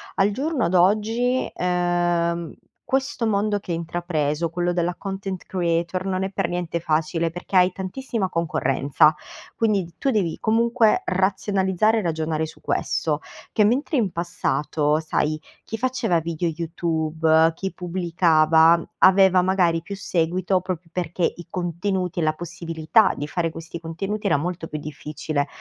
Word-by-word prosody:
al 200 +2 +3
giorno 275 - -1
d'oggi, 215 +8 +2
ehm, 175 -1 0 0.3
questo 265 -3 0
mondo 205 0 +1
che 185 - -7
hai 165 - 0
intrapreso, 165 -2 -1
quello 175 +1 -1
della 175 0 -1
content 195 -1 -5
creator, 175 0 -1
non 190 -1 -1
è 190 - -1
per 195 -2 -1
niente 175 -1 -2
facile, 165 +1 0
perché 175 +2 -2
hai 180 0 +5
tantissima 195 +1 -3
concorrenza, 150 -3 +2 0.4
quindi 215 -4 +2
d 170 -1 -13
tu 275 - 0
devi, 195 -9 0
comunque, 230 0 +3
razionalizzare 190 +2 +1
e - - +1
ragionare 160 -2 -1
su 160 - -12
questo: 155 -2 -1 0.3
che 210 - +3
mentre 270 +7 +1
in 215 -6 +2
passato, 150 -3 0
sai, 155 -1 0 0.3
chi 225 - -5
faceva 225 -8 0
video 170 +1 -2
YouTube, 160 -1 +1
chi 190 +2 -4
pubblicava, 165 -2 +3 0.2
aveva 190 -1 +6
magari 180 -3 +2
più 200 +3 -7
seguito, 180 +1 0
proprio 185 -2 -4
perché 175 0 -3
i 175 - -11
contenuti, 180 0 -2
e - - 0
la 155 - +3
possibilità 170 +4 +1
di 145 - -4
fare 165 +1 -1
questi 165 +1 -8
contenuti, 195 +6 -3
era 145 - +3
molto 170 +1 -4
più 155 - -5
difficile, 150 0 -4
175 Hz, 145 wpm, -23 LUFS, 165-195 Hz, 0.4 s, aveva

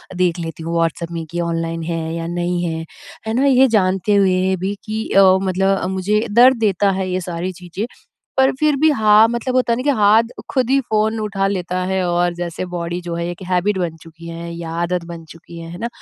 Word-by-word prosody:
देख 180 -1 +1
लेती 165 -1 -6
हूँ 165 +1 -4
व्हाट्सएप 165 0 -1
में 165 -1 -4
कि 175 - -3
ऑनलाइन 165 -1 -2
है 165 -1 -3
या 165 0 -4
नहीं 175 0 -2
है। 160 -1 -3 0.4
है 220 - -1
ना? 260 +4 +2
ये 265 -1 +5
जानते 195 -2 +2
हुए 190 -1 +2
भी 190 +2 -2
कि 220 +1 -4
अ, 195 - +5 0.2
मतलब 195 0 0
मुझे 205 +4 0
दर्द 250 +3 +6
देता 200 -2 +2
है 190 -1 -2
ये 185 - -1
सारी 175 +1 -4
चीज़ें 180 +4 -6 0.5
पर 265 0 +4
फ़िर 300 +1 +2
भी 315 +1 +5
हाँ 215 -3 +5
मतलब 240 +2 -2
होता 250 -2 +2
है 230 - -1
ना 255 - -3
कि 290 - +1
हाथ 210 +2 +5 0.3
खुद 255 -3 0
ही 275 +1 +4
फ़ोन 220 -1 0
उठा 195 -2 -1
लेता 180 -2 -2
है 190 0 +1
और 175 0 +1
जैसे 175 +1 -4
बॉडी 170 +1 -3
जो 170 -1 -5
है 170 0 -3
1 175 +2 -8
हैबिट 185 +2 +1
बन 170 -3 -2
चुकी 165 +1 -13
है 170 0 -7
या 165 -1 -6
आदत 175 0 -1
बन 170 -1 -9
चुकी 165 +1 -13
है। 165 - -8
है 175 - -8
ना? 235 - -3
185 Hz, 225 wpm, -19 LUFS, 170-215 Hz, 0.5 s, दर्द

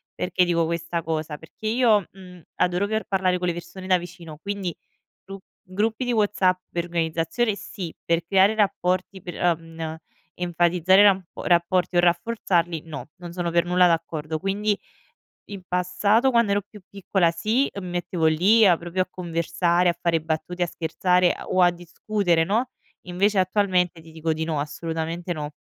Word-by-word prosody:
Perché 180 0 +1
dico 170 -1 +1
questa 170 +1 -3
cosa? 155 -1 -3
Perché 160 +8 -9
io, 220 -4 +3
mhmm, 180 -2 -14
adoro 180 +2 +1
per 220 +1 -2
parlare 185 -2 +1
con 180 - -2
le 175 - +1
persone 175 +2 -9
da 185 -1 +4
vicino, 175 -3 -10
quindi 195 0 -4 0.5
gru 195 0 -8 0.3
gruppi 220 +5 -1
di 245 - 0
WhatsApp 200 -4 +2
per 170 0 -2
organizzazione 170 +6 -1
sì, 180 -4 -7
per 170 0 0
creare 195 +3 +4
rapporti, 190 -2 0
per, 175 -1 -8
ehm, 170 -2 +1 0.2
n 160 -1 -5 0.4
enfatizzare 175 +2 +3
rap 195 -2 +4 0.2
rapporti 175 +1 +2
o - - +6
rafforzarli, 175 -2 +1
no, 155 -2 -8
non 175 -1 -9
sono 175 -1 -2
per 170 +1 +2
nulla 180 +1 +4
d'accordo, 160 -2 -2
quindi 205 +2 0 0.7
in 200 -2 -7
passato, 200 +8 +2
quando 235 -4 +3
ero 205 0 +1
più 205 0 -16
piccola, 190 -3 +1
sì, 220 +11 +1
mi 185 - -7
mettevo 175 -1 -1
lì 190 +9 +5
a 180 -3 +5
proprio 175 +2 -2
a 185 - -7
conversare, 170 0 0
a 170 - -4
fare 165 -1 +1
battute, 160 +3 -3
a - - -3
scherzare, 180 +2 +1
ehm, - - -10
o 185 0 +3
a 175 - +6
discutere, 175 0 -1
no, 230 +8 0 0.4
invece 195 +3 +1
attualmente 185 -3 +1
ti 160 0 -15
dico 160 0 -2
di 160 0 -2
no, 160 -3 -2
assolutamente 165 +3 -4
no. 150 -3 -5
180 Hz, 170 wpm, -24 LUFS, 170-195 Hz, 0.7 s, o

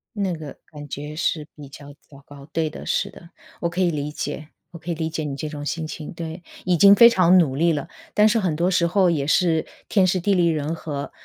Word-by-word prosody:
那 195 -3 -1
个 155 -4 -8
感 145 -1 -10
觉 150 +2 -7
是 155 -1 -1
比 145 -2 -11
较 145 0 -12
糟 140 -1 -16
糕， 140 0 -13
对 160 -1 0
的， - - -10
是 - - 0
的。 170 - -15 0.3
我 170 - 0
可 180 +2 -2
以 175 - +3
理 150 -1 -3
解， 155 +1 -5 0.2
我 170 - -9
可 170 +1 -5
以 - - 0
理 160 0 -3
解 155 -1 -4
你 140 -2 -4
这 150 +2 -5
种 145 -1 -7
心 160 +1 -3
情。 155 0 -7
对， 165 +1 -7 0.2
已 180 -2 +2
经 200 +4 +8
非 235 +3 +8
常 185 -4 +4
努 135 -6 +1
力 165 +3 +2
了， 150 +3 -4 0.2
但 210 +1 +5
是 225 - +2
很 175 -6 -1
多 175 +3 +1
时 175 -2 +2
候 180 +1 +3
也 145 -4 0
是 160 +1 +2 0.2
天 195 -3 +3
时 185 0 +1
地 200 +3 +1
利 175 -1 +3
人 155 0 -1
和， 145 -3 -6
160 Hz, 265 characters per minute, -22 LUFS, 150-180 Hz, 0.3 s, 经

